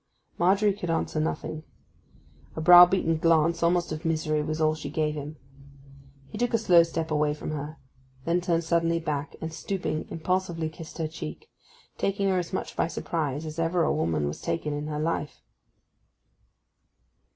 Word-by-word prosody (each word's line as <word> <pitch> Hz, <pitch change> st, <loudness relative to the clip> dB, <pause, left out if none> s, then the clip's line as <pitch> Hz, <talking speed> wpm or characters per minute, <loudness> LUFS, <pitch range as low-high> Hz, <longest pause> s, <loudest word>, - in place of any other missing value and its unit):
Margery 195 Hz, +4 st, +3 dB
could 185 Hz, -3 st, -6 dB
answer 165 Hz, -1 st, -1 dB
nothing. 155 Hz, 0 st, -3 dB, 0.9 s
A -, -, -4 dB
browbeaten 175 Hz, -1 st, +7 dB
glance, 165 Hz, 0 st, +3 dB
almost 170 Hz, 0 st, +2 dB
of 155 Hz, +1 st, -5 dB
misery, 155 Hz, -2 st, 0 dB
was 155 Hz, +1 st, -3 dB
all 155 Hz, -1 st, +3 dB
she 155 Hz, -2 st, -6 dB
gave 155 Hz, 0 st, 0 dB
him. 150 Hz, +1 st, -7 dB, 0.9 s
He 210 Hz, -, -6 dB
took 240 Hz, -1 st, +1 dB
a -, -, +5 dB
slow 180 Hz, -6 st, +6 dB
step 165 Hz, -1 st, -2 dB
away 150 Hz, -1 st, +1 dB
from 155 Hz, -, -6 dB
her; 150 Hz, +1 st, -5 dB, 0.5 s
then 170 Hz, +2 st, +1 dB
turned 170 Hz, -2 st, 0 dB
suddenly 165 Hz, 0 st, +1 dB
back 150 Hz, -2 st, -3 dB
and, 160 Hz, 0 st, -5 dB
stooping, 160 Hz, -3 st, -3 dB
impulsively 170 Hz, -1 st, -1 dB
kissed 160 Hz, 0 st, -11 dB
her 160 Hz, -2 st, -1 dB
cheek, 75 Hz, -, -8 dB, 0.5 s
taking 195 Hz, 0 st, 0 dB
her 185 Hz, -1 st, +2 dB
as 175 Hz, -, -5 dB
much -, -, -4 dB
by -, -, +1 dB
surprise 155 Hz, -3 st, -3 dB
as 155 Hz, +1 st, -6 dB
ever 165 Hz, +1 st, +1 dB
a -, -, +2 dB
woman 80 Hz, -3 st, 0 dB
was 75 Hz, -, -5 dB
taken 150 Hz, -2 st, -2 dB
in 145 Hz, +1 st, -4 dB
her 150 Hz, -1 st, -3 dB
life. 155 Hz, -2 st, -3 dB
160 Hz, 165 wpm, -27 LUFS, 155-175 Hz, 0.9 s, browbeaten